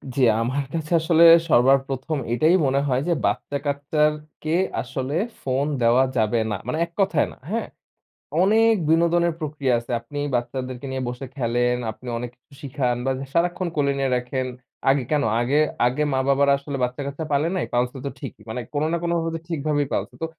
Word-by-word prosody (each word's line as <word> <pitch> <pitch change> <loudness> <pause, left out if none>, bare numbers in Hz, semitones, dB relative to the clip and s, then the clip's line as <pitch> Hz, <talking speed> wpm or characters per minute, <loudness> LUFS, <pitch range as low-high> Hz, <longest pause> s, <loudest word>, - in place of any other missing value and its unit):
জি, 135 - 0 0.2
আমার 130 +4 -1
কাছে 160 0 -4
আসলে 165 0 +4 0.3
সবার 135 +2 +6
প্রথম 135 +3 -3 0.2
এটাই 155 +8 +4
মনে 135 +1 +2
হয় 130 0 +1
যে 170 - +3
বাচ্চা-কাচ্চার 145 +2 0 0.3
কে 155 +2 0 0.3
আসলে 130 +3 -4 0.3
ফোন 135 +2 0 0.2
দেওয়া 120 +3 +5
যাবে 110 +1 +2
না। - - 0
মানে 155 - -1
এক 170 - -21
কথায় 180 -6 +2
না, - - -15
হ্যাঁ? 230 +2 -2 0.8
অনেক 225 +3 +4 0.2
বিনোদনের 170 +1 +3
প্রক্রিয়া 145 -5 -1
আছে। 120 - -9
আপনি 145 +5 -7 0.2
বাচ্চাদেরকে 125 +1 -3
নিয়ে 130 -1 -3
বসে 125 +2 -6
খেলেন, 120 -1 +1 0.2
আপনি 125 +3 -13
অনেক 120 0 -4
কিছু 125 - -26
শিখান 130 -3 -1
বা 135 - +1 0.2
সারাক্ষণ 175 +1 +1
কোলে 140 -2 +2
নিয়ে 135 -1 0
রাখেন। 130 +1 -2 0.4
আগে 135 -1 +3
কেন 150 -2 +2 0.2
আগে 140 +5 +2 0.3
আগে 130 +5 +1
মা-বাবারা 140 +1 +3
আসলে 140 0 -5
বাচ্চা-কাচ্চা 140 +5 -3
পালে 145 +3 +2
নাই? 180 - -1
পালসে 125 +2 0
তো - - -1
ঠিকই। 135 -6 -8
মানে 125 +3 -3
কোনো 145 +2 0
না 170 - +1
কোনোভাবে 165 -1 -1
ঠিকভাবেই 150 -3 -1
পালসে। - - -2
তো - - 0
140 Hz, 175 wpm, -23 LUFS, 130-155 Hz, 0.8 s, সবার